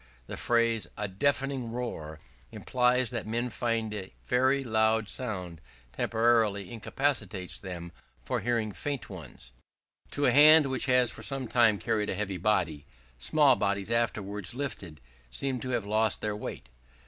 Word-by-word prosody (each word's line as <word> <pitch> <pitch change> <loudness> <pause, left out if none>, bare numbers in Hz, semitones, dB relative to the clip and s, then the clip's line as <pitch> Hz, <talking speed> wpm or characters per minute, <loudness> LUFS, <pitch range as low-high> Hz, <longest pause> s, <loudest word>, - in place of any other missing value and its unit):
The - - -6
phrase 115 -5 +1
"a 105 - -2
deafening 135 +3 -1
roar," 80 -11 -5 0.3
implies 125 0 +1
that 120 -3 -4
men 120 +2 -2
find 115 -3 -1
a 95 -6 -6
very 130 - +2
loud 110 -2 +2
sound 90 -10 -4 0.3
temporarily 110 -4 +1
incapacitates 110 -6 -2
them 85 -3 -7 0.3
for - - -1
hearing 115 -3 -1
faint 140 +1 -5
ones. 75 -8 -11 0.6
To 145 - 0
a - - +5
hand 150 -1 +7
which 130 0 0
has 125 -2 +4
for - - -10
some 135 -2 -3
time 115 -3 +4
carried 110 -1 -1
a - - -1
heavy 100 -2 -3
body, 85 -6 0 0.3
small 140 - +4
bodies 100 0 -1
afterwards 105 -2 -1
lifted 95 - -5 0.3
seem 130 - -3
to 130 - -6
have 120 -5 -1
lost 110 +1 +1
their 105 -1 -2
weight. 105 -9 -7
110 Hz, 150 wpm, -29 LUFS, 100-125 Hz, 0.6 s, hand